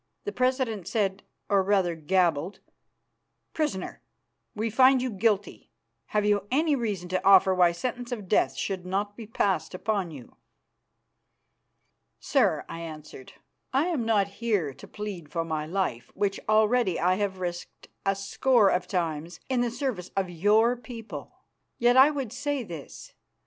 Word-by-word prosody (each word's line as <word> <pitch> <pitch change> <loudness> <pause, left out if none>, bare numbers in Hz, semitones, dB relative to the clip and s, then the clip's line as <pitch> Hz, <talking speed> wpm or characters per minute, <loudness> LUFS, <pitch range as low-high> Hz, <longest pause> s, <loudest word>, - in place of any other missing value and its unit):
The 205 - -3
president 255 -5 0
said, 195 -3 0 0.3
or 200 -1 +3
rather 190 -3 +2
gabbled, 170 +1 0 0.9
"Prisoner, 295 - -3 0.5
we 215 +2 -1
find 260 +3 +6
you 255 0 -2
guilty. 205 -1 -1 0.4
Have 210 -1 0
you 205 -1 +1
any 300 +3 +2
reason 210 -8 -3
to 185 0 -1
offer 190 -1 +6
why 180 -2 +4
sentence 245 +7 -4
of 215 -6 -5
death 205 - +2
should 190 -3 -3
not 200 +3 -2
be 225 -1 -9
passed 195 -5 0
upon 200 -2 -1
you?" 140 -6 -12 1.8
"Sir," - - +1
I 165 - -7
answered, 155 -5 -9 0.4
"I 290 +7 +2
am 305 -9 -1
not 215 -3 +2
here 200 -12 0
to 140 - -13
plead 195 -8 -7
for 165 -1 -1
my 155 -2 -3
life, 175 -9 -2
which 200 -1 -1
already 215 -2 +3
I 180 +3 +3
have 200 -2 -1
risked 175 -1 -6 0.2
a 195 0 +1
score 205 +2 +3
of 180 -1 0
times 165 -2 -3
in 255 -2 +1
the 245 - +1
service 235 -7 -3
of 190 -2 0
your 210 +7 +3
people. 230 -2 -10 0.3
Yet 240 +1 +4
I 265 +3 +8
would 270 -6 -4
say 285 0 -2
this. 165 -9 -10
200 Hz, 150 wpm, -27 LUFS, 180-235 Hz, 1.8 s, I